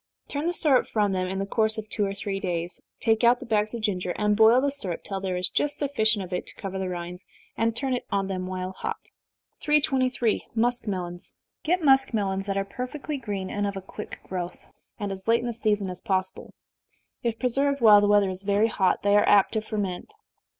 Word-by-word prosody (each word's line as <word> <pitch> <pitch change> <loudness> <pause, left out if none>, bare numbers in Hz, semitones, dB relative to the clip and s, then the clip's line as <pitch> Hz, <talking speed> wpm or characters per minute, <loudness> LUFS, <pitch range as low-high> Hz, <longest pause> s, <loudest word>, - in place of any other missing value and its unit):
Turn 295 +3 -3
the 350 - +1
syrup 280 -6 +4
from 205 -3 +1
them 185 -1 -1
in 190 +1 -3
the 195 - -1
course 220 +2 +1
of 220 0 -5
two 210 - -1
or 195 -1 -1
three 195 0 -3
days, 175 -2 -3 0.2
take 225 0 +2
out 240 +1 +5
the - - -8
bags 215 -1 0
of 230 - -5
ginger, 180 -4 -1
and 210 0 +2
boil 225 +3 +6
the 280 +1 +1
syrup 195 -12 -4
till 195 -2 -4
there 185 -2 -2
is 180 0 0
just 290 0 0
sufficient 220 -8 +1
of 180 - -9
it 180 - -3
to - - -9
cover 195 -2 -5
the 190 -1 -2
rinds, 180 +1 -6 0.3
and 225 0 0
turn 265 +2 -1
it 250 - -3
on 195 -1 +1
them 185 -1 -3
while 185 0 -4
hot. - - -4 0.6
323. 260 -6 +1
Muskmelons. 200 -7 -2 0.3
Procure 345 +1 +1
muskmelons 215 -8 +2
that 195 0 -1
are 195 - 0
perfectly 270 +7 -5
green, 200 -7 -4
and 205 0 -1
of 200 -1 -4
a - - -2
quick 185 - -9
growth, 180 -1 -6 0.3
and 205 -2 -3
as 190 +1 -8
late 230 +1 +4
in - - -5
the 240 - -2
season 210 -3 0
as 180 -1 -5
possible. 185 -1 -2 0.7
If 230 -2 -1
preserved 275 +3 +1
while 210 -4 +8
the 205 - +3
weather 205 -2 +4
is 185 0 -5
very 205 +3 +2
hot, 190 -3 +1
they 205 0 +4
are 205 - +4
apt 200 -2 +5
to 220 - -1
ferment. 205 - -4
205 Hz, 220 wpm, -26 LUFS, 190-235 Hz, 0.7 s, while